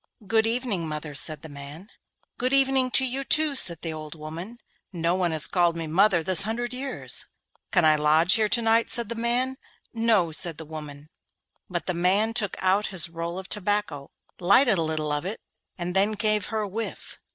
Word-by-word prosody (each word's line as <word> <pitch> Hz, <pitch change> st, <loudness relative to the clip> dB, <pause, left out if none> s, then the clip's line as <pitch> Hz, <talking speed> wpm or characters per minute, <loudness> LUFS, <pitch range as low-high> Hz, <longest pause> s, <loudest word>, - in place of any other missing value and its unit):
'Good 220 Hz, +2 st, +2 dB
evening, 225 Hz, -8 st, -1 dB
mother,' 150 Hz, -1 st, -6 dB
said 150 Hz, +1 st, +3 dB
the -, -, -7 dB
man. 145 Hz, +5 st, -11 dB, 0.5 s
'Good 255 Hz, +2 st, 0 dB
evening 270 Hz, -1 st, +3 dB
to 265 Hz, +1 st, +5 dB
you 265 Hz, +2 st, -1 dB
too,' 305 Hz, +1 st, +2 dB
said 170 Hz, -10 st, -1 dB
the 165 Hz, -2 st, -4 dB
old 155 Hz, 0 st, -8 dB
woman. 165 Hz, +9 st, -8 dB, 0.3 s
'No 170 Hz, -2 st, -1 dB
one 180 Hz, -1 st, 0 dB
has 160 Hz, -2 st, 0 dB
called 175 Hz, -2 st, +1 dB
me 165 Hz, -, -4 dB
mother 175 Hz, +2 st, +2 dB
this 185 Hz, +2 st, +8 dB
hundred 240 Hz, +4 st, -2 dB
years.' 265 Hz, +2 st, -1 dB, 0.4 s
'Can 170 Hz, -, +3 dB
I 155 Hz, -1 st, +4 dB
lodge 155 Hz, +4 st, +3 dB
here 215 Hz, -1 st, +2 dB
to 230 Hz, +1 st, +2 dB
night?' 225 Hz, +1 st, +2 dB
said 235 Hz, -3 st, +1 dB
the -, -, -2 dB
man. 240 Hz, +3 st, -1 dB, 0.4 s
'No,' 225 Hz, -7 st, +1 dB
said 170 Hz, -1 st, 0 dB
the 160 Hz, -, -7 dB
old 155 Hz, -, -17 dB
woman. 150 Hz, -1 st, -9 dB, 0.6 s
But 175 Hz, -2 st, -4 dB
the 185 Hz, -, -2 dB
man 190 Hz, +6 st, +1 dB
took 215 Hz, -5 st, -1 dB
out 190 Hz, +3 st, +1 dB
his 180 Hz, -4 st, 0 dB
roll 170 Hz, +1 st, -5 dB
of 190 Hz, 0 st, -7 dB
tobacco, 205 Hz, -9 st, -3 dB, 0.3 s
lighted 200 Hz, +3 st, +4 dB
a -, -, +1 dB
little 155 Hz, -1 st, -2 dB
of 145 Hz, 0 st, -2 dB
it, 195 Hz, +5 st, -5 dB, 0.4 s
and 180 Hz, 0 st, -4 dB
then 200 Hz, +3 st, +2 dB
gave 215 Hz, -1 st, 0 dB
her 220 Hz, 0 st, -2 dB
a 210 Hz, -, -3 dB
whiff. 220 Hz, +4 st, -7 dB
190 Hz, 200 wpm, -25 LUFS, 160-225 Hz, 0.6 s, this